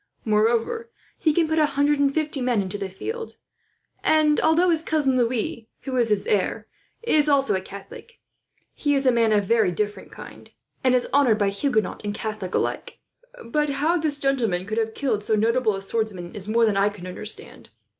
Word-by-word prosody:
Moreover, 230 - +1 0.3
he 315 - +3
can 325 +1 +2
put 315 0 +1
a 305 - +4
hundred 290 +1 +3
and 280 -1 +3
fifty 300 -2 -2
men 245 -3 +1
into 200 +1 -3
the 195 -1 -4
field; 450 - -6 0.7
and 305 -1 +3
although 340 +3 +3
his 320 -2 +1
cousin 300 -5 +1
Louis, 235 -2 -1
who 265 -2 -5
is 240 -3 +2
his 210 -2 +1
heir, 200 -3 0 0.4
is 305 -10 +3
also 275 -9 +2
Catholic, 200 - -12 0.6
he 290 -1 0
is 275 0 0
a 255 - +5
man 230 -2 +2
of 205 -1 +3
very 220 -3 +2
different 205 +3 -4
kind, - - -12 0.3
and 255 -1 +4
is 250 - +1
honoured 265 -6 +4
by 205 -2 +1
Huguenot 220 0 -1
and 205 0 -3
Catholic 215 -4 -4
alike. - - -2 0.5
But 295 +5 0
how 295 +5 +1
this 305 -2 +1
gentleman 235 -11 0
could 215 +3 -2
have 225 0 -2
killed 235 -7 -1
so 215 - +1
notable 225 0 +1
a 195 - -7
swordsman 195 -5 -3
is 200 -1 -5
more 230 +2 +3
than 210 -3 +1
I 200 +1 +3
can 205 -3 -11
understand. 195 +4 -5
235 Hz, 190 wpm, -24 LUFS, 210-290 Hz, 0.7 s, a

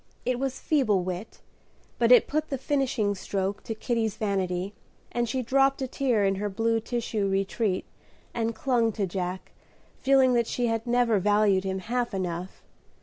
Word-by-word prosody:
It 250 -1 0
was 270 -1 -2
feeble 220 - +2
wit, 185 +4 -6 0.6
but 235 0 +4
it 250 - +8
put 310 +1 -1
the 275 - -2
finishing 260 -6 0
stroke 195 0 -3
to 225 - -3
Kitty's 225 -2 -1
vanity, 190 -2 -1 0.4
and 240 -1 -1
she 255 +2 -1
dropped 270 +2 +3
a - - -2
tear 245 -6 +1
in 195 0 +1
her 210 - -1
blue 225 +3 +1
tissue 225 -3 -2
retreat, 195 0 0 0.5
and 230 -1 -1
clung 240 -4 +1
to 200 -2 -1
Jack, 185 0 -4 0.5
feeling 265 -2 +4
that 235 -2 +2
she 245 - -1
had 225 0 -1
never 240 -3 +3
valued 205 -1 +3
him 190 0 -1
half 235 +3 -2
enough. 180 -1 -4
225 Hz, 165 wpm, -27 LUFS, 195-245 Hz, 0.6 s, it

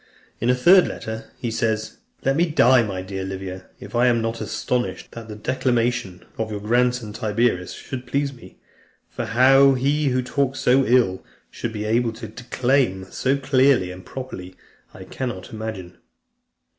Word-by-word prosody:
In 120 - 0
a 125 - +4
third 175 +8 +6
letter, 110 0 -6
he 120 - -3
says, 110 -1 -1 0.3
"Let 135 +1 +3
me 170 +4 +3
die, 130 -5 +5
my 95 -5 -3
dear 95 0 -5
Livia, 95 -1 -6
if - - -11
I 120 +1 +3
am 120 -1 +3
not 115 0 -3
astonished, 125 -1 -3
that 115 -1 -9
the 105 - -7
declamation 120 -5 -1
of 110 -1 -1
your 105 -1 -4
grandson, 120 0 0
Tiberius, 110 -4 0
should 130 -1 -7
please 140 0 -1
me; 120 - -15 0.5
for - - -4
how 135 +4 +5
he 140 +3 +1
who 130 -1 +1
talks 135 +1 -1
so 130 +2 +4
ill, 115 -7 +2 0.3
should 120 - -4
be 105 -1 -4
able 115 +1 +1
to 110 - -8
declaim 120 -3 -1
so 135 +2 0
clearly 130 -7 +3
and 90 0 -10
properly, 95 -7 -8 0.4
I - - -11
cannot 120 -8 -5
imagine." 110 -5 -6
120 Hz, 165 wpm, -22 LUFS, 105-130 Hz, 0.5 s, third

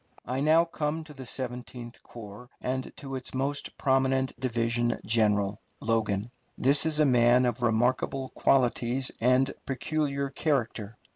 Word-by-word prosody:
I 130 +2 -3
now 160 +4 +4
come 160 -1 -3
to 155 -1 -13
the 135 -3 -10
Seventeenth 125 -1 -7
Corps 115 +1 -11
and 130 +1 -3
to 135 -1 -7
its 130 0 -7
most 140 +2 -3
prominent 130 0 +1
division 120 -1 -1
general, 105 -2 +1 0.2
Logan. 110 -1 -1 0.3
This 140 +4 +6
is 155 -1 +2
a 155 - +5
man 125 -1 +4
of 120 0 -2
remarkable 125 +3 0
qualities 125 0 +1
and 130 +3 +3
peculiar 140 0 -2
character. 120 -7 -2
130 Hz, 135 wpm, -28 LUFS, 120-135 Hz, 0.3 s, This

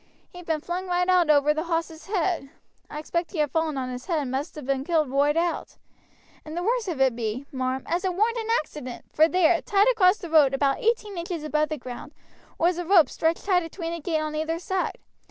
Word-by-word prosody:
He'd 355 -1 -11
been 315 -2 0
flung 360 +3 -4
right 360 0 +1
out 360 -3 +4
over 295 0 +5
the 310 +2 -3
hoss' 330 -1 -3
head. 360 -7 -1 0.4
I - - -7
expect 335 +2 -2
he - - -5
had 300 -2 +1
fallen 320 -3 0
on 255 -1 -3
his 250 0 -7
head 340 -4 0
and 280 -4 -2
must 275 +5 -3
have 300 - -8
been 270 0 0
killed 310 -3 +1
roight 290 +3 +2
out; 340 0 -2 0.7
and 310 +2 -8
the 350 - -2
worst 465 +1 0
of 330 -7 -3
it 265 -3 +3
be, 235 +3 -3
marm, 260 0 -2
as 345 +3 -1
it 370 -2 -1
warn't 450 +5 +1
an 450 0 -5
accident, 255 -5 -6
for 315 +1 +5
there, 345 -1 +3
tight 405 -1 +3
across 390 -4 +4
the 345 -5 -9
road, 290 -4 +5
about 275 0 +1
eighteen 430 -4 0
inches 340 -2 -4
above 305 0 0
the 310 - -3
ground, 250 +3 -9 0.4
was 345 +1 +1
a - - -2
rope 340 -5 +5
stretched 325 +1 -1
tight 370 -3 +3
atween 330 0 -5
a 340 - -4
gate 320 +1 -1
on 310 0 -3
either 315 +2 -1
side. 370 +2 -2
325 Hz, 230 wpm, -25 LUFS, 295-360 Hz, 0.7 s, over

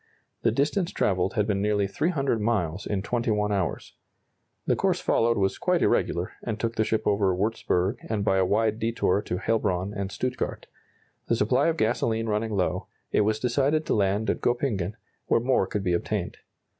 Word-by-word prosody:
The 115 - +3
distance 150 - 0
travelled 95 -1 0
had 105 -3 +2
been 100 -2 0
nearly 105 -1 +1
300 140 - 0
miles 100 -5 -1
in 100 -2 -1
21 110 -3 0
hours. 95 -4 -2 0.7
The - - +2
course - - +1
followed 115 0 +2
was 95 -1 0
quite - - +1
irregular, 85 +1 +1
and 110 -2 -4
took 115 0 -2
the 110 - +2
ship 110 0 -1
over 100 -3 +2
Wurtzburg, 100 0 0
and 105 -2 -1
by 95 - +3
a - - +4
wide 110 +3 +1
detour 115 -4 +1
to 90 - -3
Heilbron 95 -2 0
and 100 -1 -4
Stuttgart. 125 +5 -3 0.6
The 115 - +2
supply 115 +6 +2
of 165 0 +1
gasoline 115 -1 +1
running 110 0 -1
low, 95 -2 -1 0.2
it - - +3
was 110 +1 +1
decided 140 +6 +1
to - - 0
land 100 +1 +1
at - - -4
Goeppingen, 110 -6 0 0.3
where - - +3
more 120 -5 +2
could 100 0 -3
be 90 - +1
obtained. 85 - -2
105 Hz, 180 wpm, -26 LUFS, 100-115 Hz, 0.7 s, a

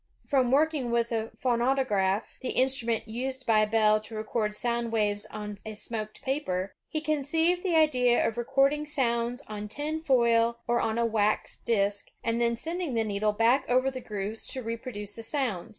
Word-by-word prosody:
From 260 -3 +2
working 290 -1 +2
with 235 0 +1
a 225 -1 -1
phonautograph, 235 -6 +1 0.2
the 260 - -4
instnmient 250 -3 +1
used 255 +4 -4
by 215 -2 +4
Bell 215 0 +3
to 220 +1 -10
record 215 0 -2
sound 235 +1 -1
waves 205 -2 0
on 210 -1 -7
a 215 -1 -7
smoked 215 0 -4
paper, 195 -9 -2 0.2
he 310 - -2
conceived 320 +4 +1
the 355 -3 0
idea 250 -6 +4
of 225 - -3
recording 275 +5 +1
sounds 245 -2 0
on 210 -1 -6
tin 295 +8 -3
foil 235 -5 +3
or 240 0 +2
on 225 0 0
a 235 - +2
wax 215 -2 +1
disk, 200 -2 0
and 230 +1 0
then 235 0 +2
sending 330 +1 -3
the 225 - +2
needle 210 0 0
back 230 +5 +3
over 255 +2 +3
the 255 -1 -6
grooves 210 0 -5
to 260 - -5
repro 230 +2 -5
duce 205 -2 -5
the 230 - -7
sounds. 225 - -2
235 Hz, 180 wpm, -28 LUFS, 215-265 Hz, 0.2 s, by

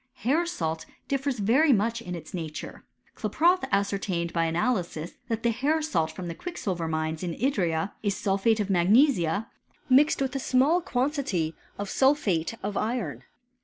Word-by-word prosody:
Hair 320 +7 +2
salt 160 - -3 0.2
difFeii 275 -1 -1
very 265 +9 +4
much 230 +1 +1
in 180 -5 -5
its 160 -2 -10
nature. 160 -4 -6 0.3
Klaproth 355 +3 +2
ascertained 195 -4 0
hf 165 -1 +1
analysis, 170 -3 -1 0.2
that 225 -1 -2
the 235 - +3
hair 280 +7 +1
salt 165 - 0
from 180 +2 -7
the 170 - -4
quicksilver 185 - -4
mindi 160 0 -2
in 170 -2 -3
luria 190 - 0
is 205 -2 -1
sulphate 200 +3 +1
of 205 - 0
magnesia, 200 - +3 0.4
mixed 280 +4 +5
with 270 0 -1
a - - 0
small 270 +7 +3
quantity 250 - -1 0.2
of 205 - -4
sulphate 230 - +2
of 205 0 -3
iron. 195 - -2
205 Hz, 155 wpm, -27 LUFS, 170-265 Hz, 0.4 s, mixed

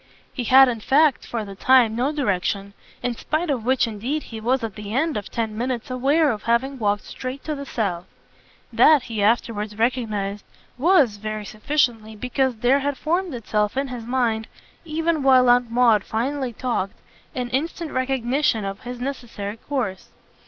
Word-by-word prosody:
He 245 - -4
had 265 +3 +8
in 235 -2 -2
fact 280 +5 +3
for 230 -3 -3
the 200 - -8
time 235 +1 +4
no 255 +5 0
direction; 200 -7 -1 0.3
in 245 -1 0
spite 310 +6 -1
of 250 -5 -2
which 260 +2 +2
indeed 235 +8 -3
he 225 -2 -8
was 250 +2 +1
at 225 -3 -3
the 210 +1 -6
end 310 +3 +1
of 205 - -4
ten 225 -2 -3
minutes 245 +1 -3
aware 280 +4 +2
of 215 - -4
having 255 +4 0
walked 205 -2 0
straight 255 +1 -7
to 310 - -3
the 280 -1 -6
south. 185 -8 -2 0.7
That, 305 -5 +6
he 225 -3 -4
afterwards 210 -1 0
recognised, 215 -4 -1 0.3
was, 285 - +3
very 215 0 -5
sufficiently, 220 -2 -1
because 250 +3 -1
there 245 +5 +3
had 280 0 -2
formed 345 -1 -1
itself 210 0 -1
in 275 0 -1
his 245 -2 -6
mind, 235 -3 0 0.4
even 325 0 0
while 260 -2 +5
Aunt 245 -1 +3
Maud 230 -4 +4
finally 260 +3 -2
talked, 230 -5 -2 0.4
an 250 -2 -3
instant 320 +4 -2
recognition 255 -3 0
of 195 +1 -5
his 245 0 -7
necessary 240 -6 -5
course. 240 -8 -4
245 Hz, 170 wpm, -23 LUFS, 215-270 Hz, 0.7 s, had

